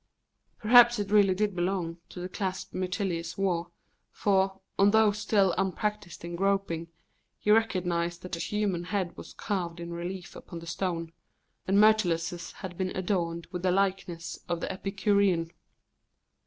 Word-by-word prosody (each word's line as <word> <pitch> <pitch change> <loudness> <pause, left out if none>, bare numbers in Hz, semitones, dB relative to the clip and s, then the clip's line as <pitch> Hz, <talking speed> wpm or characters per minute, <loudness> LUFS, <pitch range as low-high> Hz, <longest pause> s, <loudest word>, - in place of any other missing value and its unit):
Perhaps 240 +1 +7
it 205 -1 -3
really 200 -3 +5
did 205 0 0
belong 175 -2 -1
to - - -9
the 180 - -4
clasp 185 0 -4
Myrtilus 185 -2 -2
wore, 175 -3 0 0.4
for, 195 -1 +1 0.2
although 210 +2 +5
still 200 -2 +2
unpractised 195 -1 -2
in 170 0 -5
groping, 195 -3 0 0.5
he 210 - +1
recognised 175 -6 +1
that 180 -1 -4
a - - -7
human 195 -2 -1
head 185 -2 -2
was - - -11
carved 175 -4 -3
in 170 0 -6
relief 175 +1 -6
upon 170 - -9
the 170 - -8
stone, 165 -1 -3 0.6
and 195 +1 +3
Mrytilus's 180 -5 +3
had 185 -3 -9
been 185 -1 0
adorned 170 -3 -1
with 180 - -4
the 185 - +1
likeness 185 -3 -1
of 170 -1 0
the - - -3
Epicurean. 195 -3 +1
185 Hz, 145 wpm, -29 LUFS, 170-200 Hz, 0.6 s, Perhaps